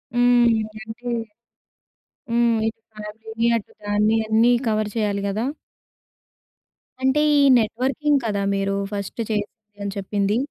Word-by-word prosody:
హ్మ్. 245 0 +5 0.4
అంటే 235 +2 -7 1.2
హ్మ్. 235 -1 +2
ఇటు 225 0 -5
ఫ్యామిలీని, 220 +2 -4
అటు 215 - -9
దాన్ని, 210 +2 +2
అన్నీ 225 +2 +4 0.2
కవర్ 215 -1 0
చేయాలి 205 -3 0
గదా! 210 +4 -1 1.6
అంటే, 265 +3 +3 0.2
ఈ - - +5 0.2
నెట్‌వ‌ర్కింగ్ 265 +6 +1
కదా! 205 -2 -1
మీరు 195 0 -1 0.2
ఫస్ట్ 200 +2 -5
చేసింది 210 0 -5
అని 200 - -3
చెప్పింది. 200 +1 0
220 Hz, 115 wpm, -22 LUFS, 205-235 Hz, 1.6 s, హ్మ్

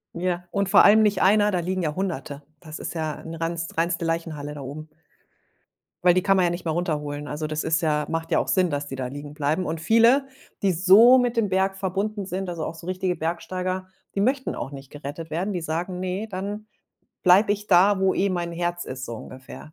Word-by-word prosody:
Ja, 175 0 -2
und 200 -1 0
vor - - +7
allem 215 +2 +7
nicht 205 -2 +2
1er, 205 +1 +4
da 180 - 0
liegen 185 +2 -2
ja 150 -2 -1
100e. 150 -7 -4 0.2
Das 155 -1 -9
ist - - -5
ja 155 -2 -3
'ne 165 0 -8
reins 165 0 -2
reinste 170 0 0
Leichenhalle 160 -3 -3
da 145 - -7
oben. 145 +4 -8 1.2
Weil 180 - +6
die 185 - +2
kann 195 0 +3
man 185 - +4
ja - - +2
nicht 175 +1 -6
mehr 160 - 0
runterholen. 150 -4 -3
Also, 150 +1 -4
das 155 0 -3
ist 160 +2 +1
ja 150 -2 +1
macht 165 +1 -3
ja 165 - +4
auch - - -2
Sinn, 185 -2 +2
dass 145 -1 -3
die 135 - -6
da 130 -1 -3
liegen 145 +2 -8
bleiben. 155 +4 -1
Und 160 0 -3
viele, 230 - +4 0.3
die 195 - +3
so 195 +9 +7
mit 245 -1 0
dem 215 -3 +2
Berg 190 +1 +1
verbunden 195 +2 -2
sind, 190 0 -4
also, 165 -3 -4
auch 165 - -5
so 165 - -12
richtige 185 -1 -1
Bergsteiger, 185 +3 -3 0.3
die 200 - +1
möchten 260 +4 0
auch 135 - -5
nicht 135 -1 -11
gerettet 150 +3 -8
werden. 185 +6 -2
Die 175 - -3
sagen: 170 +3 -3
„Ne, 185 +4 -3
dann 205 +3 -5 0.6
bleibe 195 +3 +5
ich 210 0 -5
da, 195 +2 +5
wo 190 0 +3
eh 195 0 +1
mein 170 -1 -2
Herz 175 +1 -2
ist“, 130 0 -6
so 115 -2 -6
ungefähr. 130 +6 -11
175 Hz, 225 wpm, -24 LUFS, 155-195 Hz, 1.2 s, vor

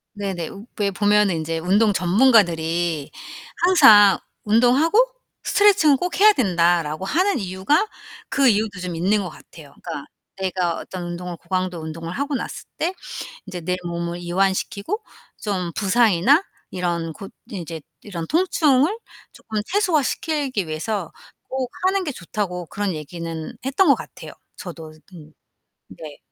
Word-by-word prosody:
네네. 190 -5 -4 0.3
왜 200 -1 +1
보면은 205 -2 +3
인제 165 +1 -3
운동 205 +5 +3
전문가들이 175 - +2 0.5
항상 220 - +7 0.2
"운동하고 250 - +4 0.4
스트레칭은 385 -9 +4
꼭 360 +5 -3
해야 425 +1 +8
된다."라고 175 - +1
하는 365 - +1
이유가 195 - +1 0.4
그 275 -1 +3
이유도 210 -4 +1
좀 180 -2 -4
있는 195 +4 +1
것 180 - -5
같아요. 155 -2 -15
그러니까 160 -5 -6 0.3
내가 185 -3 -1
어떤 185 -2 -7
운동을 175 0 -5
고강도 185 0 -3
운동을 165 +1 -6
하고 280 +3 -2
났을 - - -5
때 350 +4 -1 0.5
인제 180 -2 -6
내 180 +3 -1
몸을 170 0 -3
이완시키고 195 - -1 0.4
좀 185 -5 -2
부상이나 225 - +4 0.3
이런 170 -2 -2
고 195 - -9 0.2
인제 170 -6 -6 0.2
이런 175 -6 -6
통증을 320 -1 +3 0.4
쪼끔 215 -1 -4
최소화시키기 305 - 0
위해서 165 +3 -3 0.4
꼭 260 -1 -2 0.2
하는 385 0 +1
게 310 - -3
좋다고 180 -4 -4
그런 200 0 -2
얘기는 160 +1 -6
했던 300 +7 +2
것 275 - +6
같아요. - - -10 0.3
저도 165 -4 -9 0.2
음 155 -2 -13 0.6
네. 150 -3 -10
190 Hz, 295 characters per minute, -22 LUFS, 170-260 Hz, 0.6 s, 해야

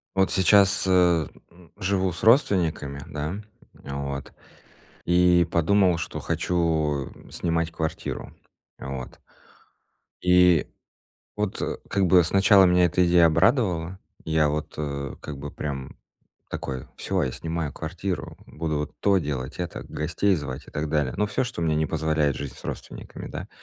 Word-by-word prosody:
Вот 95 0 +2
сейчас, 100 +1 +5
э, 90 -4 +4 0.5
живу 95 -1 0
с - - -8
родственниками, 85 - +2
да, 75 +5 -4 0.5
а 70 - -5
вот. 70 -1 -5 0.7
И 90 -1 +4
подумал, 90 +1 +3
что 85 - -5
хочу 80 -5 0 0.2
снимать 85 -1 -1
квартиру. 80 -1 -4 0.5
Вот. 65 -2 -7 1.0
И 90 -2 +5 0.7
вот, 105 -2 -2
э, - - -2
как 100 -1 +1
бы 90 0 +6
сначала 100 +2 +5
меня 90 0 +4
эта 90 +1 +2
идея 85 -1 +6
обрадовала. 90 - +2 0.3
Я 80 -1 +2
вот, 75 +1 -3
э, 70 -2 -4
как 75 -2 -7
бы, 70 +1 -6
прям 70 -3 -6 0.5
такой: 65 -2 -5
"Всё, - - -1
я 65 - -1
снимаю 80 -1 -3
квартиру, 90 +3 -5
буду 75 -1 -3
вот 75 - -4
то 100 -1 +4
делать, 70 -5 -4
это, 90 -1 -4
гостей 85 +6 0
звать" 70 -1 -6
и - - -11
так 75 +1 -3
далее. 75 -4 0
Ну, 105 - +1
всё, 130 - -1
что 120 -8 -5
мне 80 -1 +1
не 80 0 +1
позволяет 80 -3 0
жить 70 -3 -5
с - - -15
родственниками, - - -7
да. - - -7
80 Hz, 145 wpm, -25 LUFS, 75-90 Hz, 1.0 s, бы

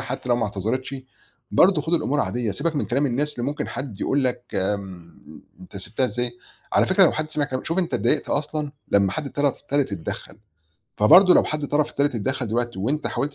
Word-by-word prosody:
حتّى 125 +1 -5
لو 120 - +3
ما 120 - 0
اعتذرتش 110 +7 -3 0.6
برضه 180 -4 +4
خُد 165 +3 0
الأمور 145 -3 +1
عاديّة، 120 -2 -1
سيبك 160 - -2
من - - -1
كلام 135 +5 +1
الناس 140 +4 -1
اللي 120 +1 -3
ممكن 145 +1 -3
حد 125 -7 -6
يقول 135 -1 +1
لك 125 -1 -1
م 95 -3 -5 0.2
أنت 90 - -12
سِبتها 110 +6 -2
إزاي؟ 120 -1 -3 0.4
على - - +4
فكرة - - +5
لو - - +4
حد 155 0 -3
سمع 150 -1 0
كلام 130 -2 -4
شوف 165 +3 -1
أنت 175 -2 0
اتضايقت 150 - +1
أصلًا 150 -1 -2 0.2
لمّا 100 -1 +3
حد 155 - -4
الطَرَف 145 0 -1
التالت 145 -5 -1
اتدخَّل، 95 +3 -6 0.6
فبرضه 180 - +7
لو - - +5
حد 150 -1 -3
طَرَف 150 +1 0
تالت 140 -1 +1
اتدخَّل 125 +2 -2
دلوقتي 120 0 -2
وأنت 140 +10 -1
حاولت 145 +1 -2
135 Hz, 200 wpm, -23 LUFS, 110-150 Hz, 0.6 s, فبرضه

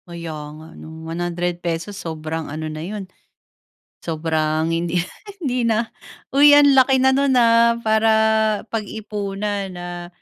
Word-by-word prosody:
Kaya 170 -2 -7 0.2
nga 160 +1 -12
'no, 160 0 -11
₱100 175 +2 -3
sobrang 160 -2 -5
ano 155 +2 -5
na 155 - -6
yun. 200 +3 -5 0.9
Sobrang 160 -1 -1
hindi, 170 +1 0 0.4
hindi 250 -5 -1
na, 225 0 0 0.4
uy 290 +1 +7
ang 290 -1 +6
laki 265 +1 +5
na 265 - +5
no'n, 275 0 +2
ah, 235 -1 +5
para 220 0 +2 0.6
pag-ipuan, 205 -2 -4
ah. 175 0 -7
180 Hz, 125 wpm, -21 LUFS, 165-225 Hz, 0.9 s, uy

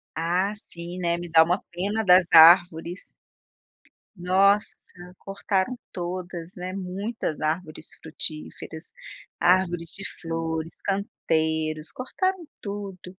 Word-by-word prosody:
Ah 180 +5 0
sim, 170 +1 -8
né, 170 -1 0
me 175 0 -7
dá 160 0 +7
uma 180 +3 0
pena 205 +5 -2
das 180 -1 +6
árvores. 170 +1 +6 1.1
Nossa, 195 +3 +3 0.4
cortaram 195 +3 -2 0.2
todas, 175 -1 -5
né, 180 +1 -5
muitas 195 -1 -4
árvores 155 +1 -3
frutíferas, 75 +1 -4 0.5
árvores 175 -2 +2
de 195 - -9 0.2
flores, 165 -1 -3
canteiros, 160 -5 -1
cortaram 370 +7 -2
tudo. 195 -3 -7
180 Hz, 100 wpm, -25 LUFS, 165-195 Hz, 1.1 s, dá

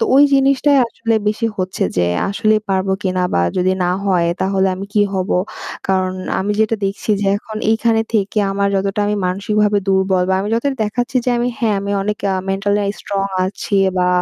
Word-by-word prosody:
তো 455 - +3
ওই 280 - +7
জিনিসটাই 275 +1 +3
আসলে 230 0 -2
বেশি 220 +2 -1
হচ্ছে 185 +1 -1
যে 90 - +3 0.2
আসলেই 215 +1 +2
পারবো 190 0 +1
কিনা 185 -1 0
বা 85 - +3
যদি 185 +1 +2
না 175 - +1
হয় 175 -3 +2
তাহলে 190 0 +1
আমি 195 +1 -6
কি 205 - +4
হব? 185 +1 -2 0.6
কারণ 185 -1 +1 0.3
আমি 205 +2 -1
যেটা 220 +1 +2
দেখছি 200 +2 -4
যে - - 0
এখন 215 +1 -8
এইখানে 225 0 +2
থেকে 210 0 +1
আমার 200 0 +1
যতটা 195 +1 -1
আমি 210 0 0
মানসিকভাবে 205 +2 +1
দুর্বল 190 -1 +2
বা - - +3
আমি 200 - -3
যতটা 270 +4 0
দেখাচ্ছি 245 +4 -2
যে 250 - +1
আমি 240 - 0
হ্যাঁ 220 -3 +1
আমি 200 0 -3
অনেক 210 +1 -2
আ - - 0 0.2
mental 200 +1 0 0.3
strong 195 -1 -2 0.2
আছি 200 +1 -3 0.2
বা 180 0 +2
200 Hz, 190 wpm, -18 LUFS, 190-220 Hz, 0.6 s, ওই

